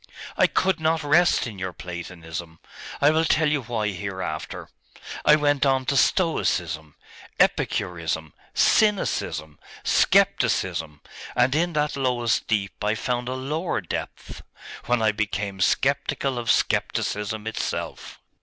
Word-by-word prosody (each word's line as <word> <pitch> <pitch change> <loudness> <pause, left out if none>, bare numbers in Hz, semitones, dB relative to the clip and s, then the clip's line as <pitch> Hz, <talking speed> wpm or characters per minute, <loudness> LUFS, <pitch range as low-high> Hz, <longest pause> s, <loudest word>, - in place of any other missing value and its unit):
I - - +4
could 190 -3 +1
not 160 0 +1
rest 170 +4 +4
in 110 -5 -7
your 95 -1 -4
Platonism 85 -2 -7 0.4
I 145 +1 +6
will 160 +1 +2
tell 160 -1 +3
you 150 -1 +1
why 110 -3 -2
hereafter. 95 -5 -5 0.6
I 150 - +8
went 145 -2 +2
on 135 -2 +2
to 140 - 0
Stoicism, 85 - +1 0.4
Epicurism, 80 -3 0 0.2
Cynicism, 175 - +1 0.2
Scepticism, 80 -5 +2 0.3
and 125 +2 +3
in 170 +3 +1
that 150 0 0
lowest 125 -3 0
deep 105 -2 -1
I 105 +1 +1
found 125 +2 -2
a 130 - -2
lower 150 +6 -2
depth, 90 - -6 0.5
when 120 -2 +2
I 110 - +4
became 100 -2 -3
sceptical 135 +3 +1
of 120 - -4
Scepticism 105 +1 0
itself. 110 - -4
115 Hz, 125 wpm, -24 LUFS, 90-145 Hz, 0.6 s, I